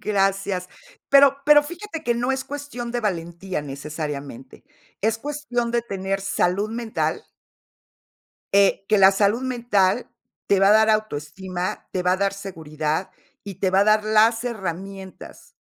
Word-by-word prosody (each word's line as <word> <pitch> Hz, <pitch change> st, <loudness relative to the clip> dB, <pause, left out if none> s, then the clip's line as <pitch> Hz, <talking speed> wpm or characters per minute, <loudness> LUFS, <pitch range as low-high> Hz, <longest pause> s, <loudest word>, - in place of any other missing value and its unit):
Gracias, 195 Hz, -2 st, 0 dB, 0.4 s
pero 275 Hz, -1 st, +6 dB
pero 295 Hz, 0 st, +7 dB
fíjate 345 Hz, +2 st, -7 dB
que 240 Hz, -2 st, +1 dB
no 245 Hz, +3 st, 0 dB
es 265 Hz, 0 st, -3 dB
cuestión 285 Hz, -4 st, -6 dB
de 240 Hz, -, -1 dB
valentía, 175 Hz, -3 st, -3 dB
necesariamente, 140 Hz, -2 st, -7 dB, 0.4 s
es 220 Hz, +2 st, 0 dB
cuestión 265 Hz, -4 st, -3 dB
de 235 Hz, 0 st, 0 dB
tener 195 Hz, -3 st, -3 dB
salud 195 Hz, +1 st, 0 dB
mental 230 Hz, -1 st, -2 dB, 1.3 s
eh, 200 Hz, 0 st, +4 dB
que 215 Hz, -, +4 dB
la 195 Hz, 0 st, +7 dB
salud 205 Hz, +5 st, +2 dB
mental 235 Hz, -4 st, +1 dB, 0.4 s
te 200 Hz, -, +4 dB
va 195 Hz, -, +5 dB
a -, -, +5 dB
dar 220 Hz, 0 st, +5 dB
autoestima, 185 Hz, -2 st, -3 dB
te 185 Hz, -, -1 dB
va 180 Hz, 0 st, +2 dB
a -, -, +2 dB
dar 195 Hz, +1 st, 0 dB
seguridad, 160 Hz, -4 st, -4 dB, 0.3 s
y 200 Hz, -3 st, -7 dB
te 190 Hz, -1 st, 0 dB
va 190 Hz, +1 st, +4 dB
a -, -, +4 dB
dar 215 Hz, 0 st, +3 dB
las 220 Hz, +2 st, +3 dB
herramientas 195 Hz, -3 st, -7 dB
200 Hz, 150 wpm, -23 LUFS, 185-235 Hz, 1.3 s, pero